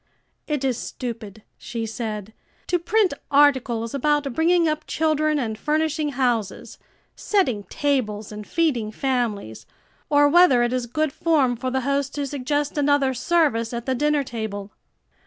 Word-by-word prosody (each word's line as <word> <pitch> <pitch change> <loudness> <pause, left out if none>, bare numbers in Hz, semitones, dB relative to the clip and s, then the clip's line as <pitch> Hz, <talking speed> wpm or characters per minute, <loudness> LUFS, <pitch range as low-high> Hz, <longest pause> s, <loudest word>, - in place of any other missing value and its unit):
"It 295 -3 -2
is 255 -3 0
stupid," 220 -4 -7 0.2
she 230 -2 -4
said, 215 -2 -5 0.3
"to 355 - 0
print 390 +1 +2 0.2
articles 260 -5 +3
about 285 -1 0
bringing 335 +3 +3
up 305 0 -2
children 310 -1 +1
and 220 -5 -3
furnishing 305 -1 0
houses, 240 -6 -2 0.4
setting 255 - 0
tables 220 -8 -1
and 210 0 -8
feeding 265 -11 0
families 220 - -2 0.4
or 290 0 +5
whether 290 -6 +5
it 240 +1 0
is 250 -1 -2
good 310 +3 -1
form 290 -7 +2
for 255 +2 -3
the 260 +1 -1
host 280 +1 -1
to 290 -1 -2
suggest 290 +2 -2
another 285 -2 +2
service 255 -4 +1
at 235 0 -4
the 260 - 0
dinner 295 +2 +1
table." 215 -5 -5
265 Hz, 145 wpm, -23 LUFS, 230-300 Hz, 0.4 s, or